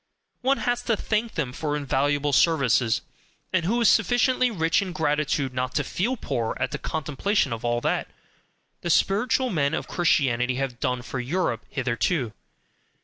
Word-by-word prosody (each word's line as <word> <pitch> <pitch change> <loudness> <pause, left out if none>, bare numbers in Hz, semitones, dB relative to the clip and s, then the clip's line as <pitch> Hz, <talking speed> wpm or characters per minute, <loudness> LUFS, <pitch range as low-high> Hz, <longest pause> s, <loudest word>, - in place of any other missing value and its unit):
One 270 +2 +2
has 245 0 -1
to 225 -3 +1
thank 220 +2 -1
them 125 -3 -2
for 150 0 -2
invaluable 145 +1 0
services; 125 -6 +3 0.5
and 180 -3 +2
who 235 +6 +1
is 230 - +5
sufficiently 250 +2 +3
rich 165 -6 +1
in 185 -3 -4
gratitude 150 -3 0
not 125 0 -2
to 150 - +2
feel 230 - -1
poor 120 - -2
at - - -1
the - - -4
contemplation 155 - -1
of 115 - -6
all 120 0 0
that - - 0 0.7
the 170 - -3
"spiritual 230 - +2
men" 150 -3 +1
of - - -4
Christianity 130 -7 +1
have 130 -2 -3
done 125 -3 -1
for 125 +2 -5
Europe 125 - -1
hitherto! 125 0 -1
145 Hz, 160 wpm, -25 LUFS, 125-195 Hz, 0.7 s, is